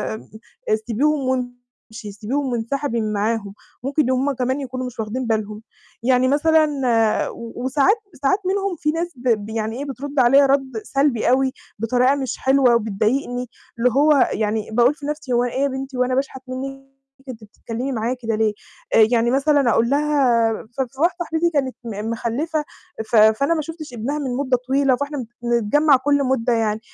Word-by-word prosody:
آآ، 220 0 -5
سيبيهم 275 +4 +1
وامشي، 245 -3 -6
سيبيهم 255 +6 -3
وانسحبي 235 +1 -2
من 215 0 -2
معاهم، 205 -1 -1 0.3
ممكن 280 0 0
هم 265 +2 +1
كمان 260 +2 -1
يكونوا 255 -1 -5
مش 250 -2 -8
واخدين 230 +3 -3
بالهم. 215 -1 -2 0.4
يعني 255 0 +3
مثلًا 285 -7 +2
و-وساعات 260 - 0 0.2
ساعات 330 +9 +2
منهم 390 -1 0
فيه 300 0 -1
ناس 340 +1 -3
ب 225 -4 0
يعني 220 +1 -3
إيه 285 - -4
بترد 280 +1 -4
عليَّ 275 +3 +6
رد 270 -3 0
سلبي 275 -5 +1
أوي 260 +1 +2 0.3
بطريقة 250 +4 +2
مش 265 -3 -3
حلوة 265 -3 +3
وبتضايقني، 235 +3 -1 0.3
اللي 250 - +4
هو 285 +1 +4
يعني 215 0 -1
باقول 240 +5 +4
في 295 -3 -10
نفْسي 295 -4 -3
هو 240 +1 +3
إيه 245 +2 -2
يا - - +3
بنتي 265 -1 -5
هو 250 - +3
أنا 255 0 -1
باشحت 265 -1 -2
منِّك، 270 +1 -6 0.4
أنتِ 225 -3 -8
بتتكلمي 235 +5 -6
معايا 235 +1 -1
كده 225 -1 0
ليه؟ 215 -1 +1 0.4
آآ، 220 -1 +7
يعني 235 0 +2
مثلًا 280 -1 +3
أقول 230 +1 +2
لها 275 -6 +2 0.2
ف - - +1
ف 265 +2 -6
واحدة 345 +2 +2
صاحبتي 325 -2 -2
دي 340 +1 +3
كانت 270 -4 -1
م 215 0 -4
مخلّفة، 295 +7 -2 0.5
ف - - +2
فأنا 220 +8 +5
ما 310 - -1
شُفتش 310 -3 -8
ابنها 270 +7 -3
من 260 -3 -3
مدة 260 -3 +1
طويلة، 270 -1 +3
فإحنا 285 -2 -4 0.2
بنتجمّع 240 +5 +3
كُلّ 285 +1 +1
مُدّة 255 -2 +1
يعني، 220 -2 0
255 Hz, 175 wpm, -21 LUFS, 230-280 Hz, 0.5 s, آآ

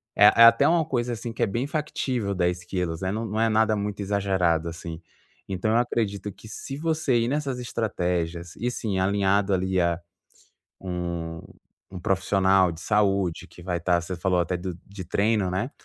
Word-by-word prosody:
é 105 - +7
é 115 +2 +7
até 115 0 +7
uma 165 -1 +3
coisa 125 -5 -1
assim 115 0 -5
que - - -1
é - - +5
bem 115 +7 -2
factível 130 -8 -2
10kg, 90 -1 -2
né, 95 0 -1
não 110 +3 -2
não 110 +1 -2
é 115 - +3
nada 110 0 +3
muito 105 0 -3
exagerado 95 -5 +1
assim. 85 0 -7 0.5
Então 95 +3 -1
eu 115 - +4
acredito 105 -4 -1
que 110 - -14
se 135 +5 -7
você 155 -5 +1
ir 115 - +1
nessas 140 -1 -1
estratégias, 90 -7 -2
e 120 +2 -2
sim, 105 -6 -2
alinhado 100 +1 +2
ali 95 0 +1
a 85 0 +1 0.8
um, 85 -3 -4 0.5
um 95 -2 -7
profissional 95 0 +3
de 80 - -10
saúde, 100 -4 +1
que 90 - -15
vai 90 -1 -2
estar 85 +1 +1
você 90 +2 -5
falou 90 +1 +1
até 85 +1 -1
do 90 0 -5
de 100 -2 -8
treino, 100 +2 +1
né. 95 +8 -2
95 Hz, 180 wpm, -25 LUFS, 90-115 Hz, 0.8 s, é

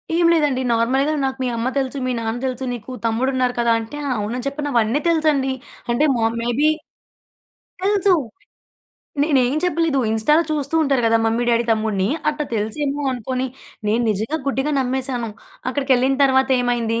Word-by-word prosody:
ఏం 340 0 +3
లేదండి 295 -5 +2
నార్మల్‌గా 255 +6 +2
నాకు 265 0 -2
"మీ - - 0
అమ్మ 230 +2 -1
తెలుసు. 270 0 -1
మీ - - 0
నాన్న 225 +1 -2
తెలుసు. 255 0 -3
నీకు 240 +1 -8
తమ్ముడు 230 +4 +1
ఉన్నారు 255 -1 +1
కదా" 235 -1 +3
అంటే 225 +6 -7 0.2
అవునని 230 +5 -3
చెప్పిన 290 +1 -3
అవన్నీ 235 +4 +2
తెలుసండి 305 -5 +2 0.4
అంటే 240 +6 +2
మొ 230 - 0 0.2
మేబీ 240 +6 +2 1.1
తెలుసు. 400 -1 +3 1.1
నేనేం 270 -4 +2
చెప్పలేదు. 330 -5 +1
ఇన్‌స్టాలో 260 +9 +3
చూస్తూ 295 0 -2
ఉంటారు 275 -4 +1
గదా 225 0 +4
మమ్మీ, 230 +2 +1
డ్యాడీ, 235 0 +2
తమ్ముడిని 215 -3 0 0.2
అట్టా 300 0 -1
తెలుసేమో 275 +7 -2
అనుకోని 255 +2 -2 0.4
నేను 225 +3 +2
నిజంగా 220 +10 -1
గుడ్డిగా 275 +3 0
నమ్మేసాను. 255 -2 -2 0.4
అక్కడికెళ్ళిన 265 -1 +2
తర్వాత 265 0 +3
ఏమైంది 235 -2 0
260 Hz, 150 wpm, -21 LUFS, 230-285 Hz, 1.1 s, గదా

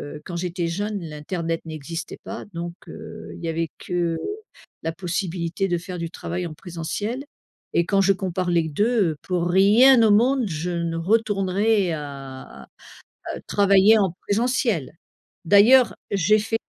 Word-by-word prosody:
heu, 150 - -9
quand 175 - -6
j'étais 175 0 -2
jeune, 205 +5 -2
l'internet 165 +2 -4
n'existait 160 +1 -6
pas - - -7
donc 170 0 -5
heu, - - -9
il - - -11
y 165 - -2
avait 165 0 -2
que 170 -2 -1 0.6
la 165 - -2
possibilité 180 0 -2
de 175 -2 0
faire 180 +1 -7
du 170 0 -3
travail 175 +1 -4
en 155 - -9
présentiel 195 - -4 0.5
et 170 - +2
quand 195 +2 +2
je 195 +1 +4
compare 185 -1 -2
les 170 -2 +2
2, 205 +4 +2
heu, 155 - -8
pour 175 -2 -1
rien 215 +8 +6
au 220 - +5
monde, 245 +4 +3
je 165 +1 -3
ne 170 -1 -2
retournerai 200 0 +1
à 140 -3 -8 0.6
à - - -5
travailler 200 +2 +5
en 195 -5 +1
présentiel! 225 - 0 0.5
D'ailleurs 230 +7 +6 0.2
j'ai 200 +2 +3
fait 225 +2 -2
180 Hz, 155 wpm, -23 LUFS, 165-205 Hz, 0.6 s, rien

